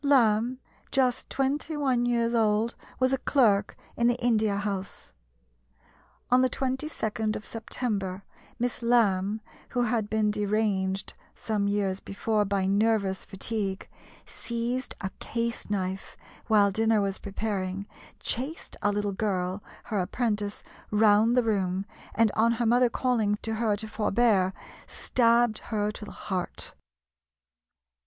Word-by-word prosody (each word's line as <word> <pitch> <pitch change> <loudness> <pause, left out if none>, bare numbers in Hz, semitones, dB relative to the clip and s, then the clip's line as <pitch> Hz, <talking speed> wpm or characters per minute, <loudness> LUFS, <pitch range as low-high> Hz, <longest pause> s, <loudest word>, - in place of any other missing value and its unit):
Lamb, 245 -3 +3 0.3
just 255 -2 +1
twenty 285 +3 -1
one 255 -4 +1
years 235 -1 +1
old, 220 0 +2 0.3
was 255 0 +3
a 270 - +1
clerk 220 -9 +2 0.2
in 235 - +2
the 240 - +3
India 220 -4 +2
House. 200 - -4 1.2
On 250 +1 +6
the 255 - +3
22d 255 -5 -2
of 210 - -6
September 205 -4 -3 0.3
Miss 245 +1 -2
Lamb, 215 -3 +2 0.3
who 245 - 0
had 220 -3 0
been 215 -1 +2
deranged 205 -2 0 0.2
some 210 -2 -1
years 200 -2 0
before 210 +2 -1
by 195 -1 0
nervous 200 -1 +1
fatigue, 195 -1 -3 0.4
seized 240 +2 -3
a 190 - -3
case 235 -1 -3
knife 190 -1 -3 0.3
while 205 -3 +5
dinner 220 +2 +3
was 195 -1 -1
preparing, 195 -2 -3 0.3
chased 270 +7 -3
a 205 - +2
little 205 0 -1
girl, 190 -1 -1 0.2
her 210 -3 -2
apprentice, 210 +1 -1 0.3
round 215 +3 +4
the 250 - +5
room, 195 -3 0 0.3
and 225 -2 +4
on 230 +2 +3
her 235 +1 -1
mother 245 +2 +4
calling 230 -5 +1
to 225 - -1
her 220 -1 +1
to 220 +2 -5
forbear, 210 -3 +2 0.4
stabbed 235 -2 +2
her 210 -1 -1
to 210 - -8
the - - -9 0.2
heart. 185 -2 -3
215 Hz, 130 wpm, -28 LUFS, 200-235 Hz, 1.2 s, On